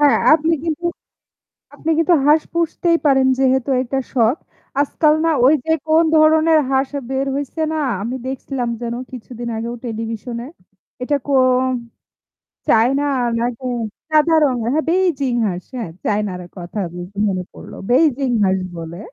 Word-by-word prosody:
হ্যাঁ 290 -1 +5 0.2
আপনি, 325 +1 +2 1.2
আপনি 320 - -5
কিন্তু 330 +2 +3
হাঁস 305 +1 +5
পুষতেই 335 0 +1
পারেন 270 -2 +4
যেহেতু 265 0 +2
এটা 260 +2 -3 0.2
শখ। 245 +3 +3 0.4
আজকাল 300 +1 +2
না - - +3 0.2
ওই 285 - +6
যে 320 - 0 0.2
কোন 320 +1 +4
ধরনের 315 +1 +5
হাঁস 265 0 +1 0.2
বের 270 +1 -1
হইছে 285 +3 -4
না - - -1 0.2
আমি 240 +5 -3
দেখছিলাম 260 -1 -3
যেন 235 0 -3 0.2
কিছুদিন 240 -1 -7
আগেও 235 +2 -4
টেলিভিশনে। 230 +1 -5 0.6
এটা 290 +3 +1
কোন 255 -2 +3 1.1
চায়না 250 +6 +3 0.4
নাকি 245 +2 -3 0.4
সাদা 310 +1 +3
রঙের 245 -5 0
হ্যাঁ 315 - 0
বেইজিং 335 -8 +1
হাস 180 -2 -4
হ্যাঁ 230 -8 -4 0.2
চায়নার 205 -3 -1 0.2
কথা 180 +4 -6
যেহেতু 180 +3 -9
মনে 185 -2 -2
পড়ল। - - -11 0.2
বেইজিং 275 -1 +3 0.2
হাস 190 0 +2 0.2
বলে। 165 +1 -7
260 Hz, 140 wpm, -19 LUFS, 230-300 Hz, 1.2 s, ওই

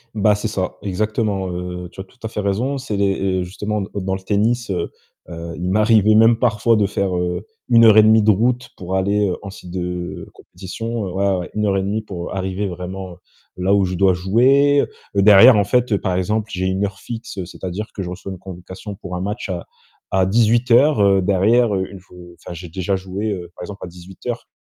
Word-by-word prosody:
Bah, 105 0 +3
c'est 105 +2 -3
ça 95 -4 -3
exactement, 105 0 -1
heu, 90 0 -5
tu - - -15
as - - -4
tout 110 +6 -25
à 110 - -4
fait 110 - -5
raison, 105 +8 -1
c'est 125 -6 -4
les 95 -1 0
heu, - - -1
justement 105 +3 -3
d 95 - -6
dans 95 -1 -2
le 95 - -2
tennis, 110 +5 0
heu 95 - -2 0.4
heu, 85 0 -7
il 90 +1 -2
m'arrivait 110 0 +4
même 115 +1 +5
parfois 115 -1 +2
de 105 -2 +2
faire, 100 -1 -1
heu, 90 +3 -3 0.2
1 115 -1 +6
heure 110 -1 +7
et 110 - +9
demie 110 +1 +5
de 105 - +2
route 120 +5 +1
pour 95 +1 -4
aller, 100 +2 +1
heu, 90 - -2
en 100 - -7
site 90 -2 -11
de 90 0 -5
compétition, 100 +3 -6
ouais, 100 +1 +1
ouais, 100 -1 +2
ouais, 90 - -5
1 105 0 0
heure 100 -1 +1
et - - +1
demie 105 +3 -2
pour 90 -4 -6
arriver 95 +1 -2
vraiment 90 0 -6 0.4
là 90 +2 +1
où 100 -1 +3
je 90 0 -3
dois 95 0 +4
jouer, 130 +10 +3 0.3
derrière 105 +5 +8
en 100 - +4
fait, 120 0 +1
par 95 -1 -2
exemple, 105 +4 -1
j'ai 95 0 -1
une 95 +2 0
heure 100 -1 -6
fixe, 115 -5 -6
c'est-à-dire 95 +4 -6
que 95 - -3
je 90 - -5
reçois 95 +2 -7
une 95 - -7
convocation 95 +2 -9
pour 90 -1 -7
un 90 - -3
match 105 +2 -4
à 90 -2 -4 0.5
à 95 -1 +3
18:00 115 -1 +4
derrière, 105 +4 +3
heu, 95 -1 -1
une 95 - -10
f - - -22
heu, 90 -1 -13
enfin - - -9
j'ai 85 +1 -9
déjà 95 +3 -2
joué, 95 +3 -4
heu, 90 -3 -6
par - - -9
exemple, 100 +2 -8
à - - -5
18:00 90 +7 -8
100 Hz, 220 wpm, -20 LUFS, 90-110 Hz, 0.5 s, et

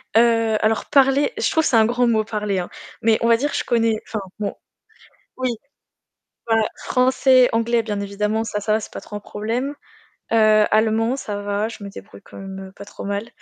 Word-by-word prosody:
Heu 230 -1 +4
alors 220 +1 +1
parler, 275 - +3
je - - +1
trouve 320 - +2
que - - +1
c'est - - +2
un 220 -1 +6
grand 245 +2 +1
mot 220 -2 +2
parler 210 -3 -2
hein. 175 - -4 0.3
Mais 220 -1 +3
on 230 - +2
va 230 0 +5
dire 285 +4 -2
je - - -1
connais, 230 -2 +1
enfin 220 - -3 0.2
bon, 205 - -2 0.8
oui, 255 0 -1 1.0
voilà, 225 -1 +3 0.2
français, 255 0 +4
anglais 230 +1 +2
bien 210 -2 -3
évidemment, 210 +2 -1
ça 210 -2 -3
ça 215 +1 0
va 215 - +2
ce 215 - -7
n'est - - -29
pas - - -7
trop 210 - -10
un - - -3
problème. 230 +8 -3 0.6
Heu, 215 -1 +5
allemand, 225 +3 +2
ça 205 -6 -5
va, 205 +1 -1
je 225 -2 -9
me 200 - -7
débrouille 100 - -12
quand - - -13
même 190 0 -8
pas 200 - -11
trop - - -9
mal. 200 +3 -3
220 Hz, 210 wpm, -21 LUFS, 210-235 Hz, 1.0 s, un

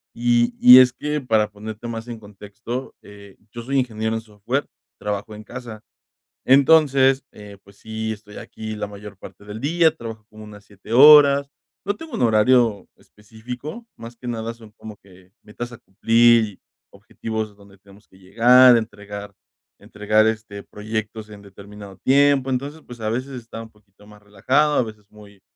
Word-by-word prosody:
Y 120 0 +1
y 125 +1 +9
es 125 -1 +5
que, 150 +2 -3
para 110 -5 0
ponerte 110 +2 -9
más 115 0 -7
en 115 -2 -8
contexto, 105 +5 -8
eh, 100 -1 -15 0.2
yo 120 -1 -8
soy 135 +2 -2
ingeniero 110 -3 -3
en 110 - -3
software, 115 +6 -4 0.3
trabajo 105 +1 -5
en 105 0 -11
casa. 120 -2 -10 0.6
Entonces, 135 -1 +4
eh, 105 -1 -13
pues 100 0 -20
sí, 110 0 -5
estoy 105 -1 -10
aquí 110 -1 -8
la 105 -1 -5
mayor 100 0 -12
parte 100 - -14
del 105 +3 -9
día, 165 +2 +2
trabajo 110 -2 -9
como 110 0 -14
unas 105 -1 -14
7 100 +2 -15
horas, 140 +1 +7 0.4
no 205 - -1
tengo 320 +8 -12
un - - -4
horario 115 -1 +2
específico, 125 - -11
más 115 +1 -11
que 125 +1 -11
nada 115 -1 -4
son, 110 -2 -17
como 110 -1 -12
que 95 -1 -21
metas 120 +3 -8
a 120 - -11
cumplir, 115 +3 +3
y, 105 -3 -12 0.3
objetivos 110 -2 -7
donde 100 -1 -20
tenemos 100 +2 -21
que 95 - -23
llegar, 120 +6 +5
entregar 105 -2 -7 0.4
entregar, 105 +1 0
este, 110 -2 -4
proyectos, 110 0 -6
en 105 -1 -13
determinado 100 0 -13
tiempo, 140 +3 +2
entonces, 140 +5 -4
pues, 120 -2 -12
a 110 - -2
veces 130 +5 -4
está 115 -2 -9
un 115 - -12
poquito 105 -1 -24
más 105 0 -17
relajado, 130 +9 0
a - - +2
veces 105 -2 -12
muy, 105 -2 -17
110 Hz, 170 wpm, -21 LUFS, 105-125 Hz, 0.6 s, y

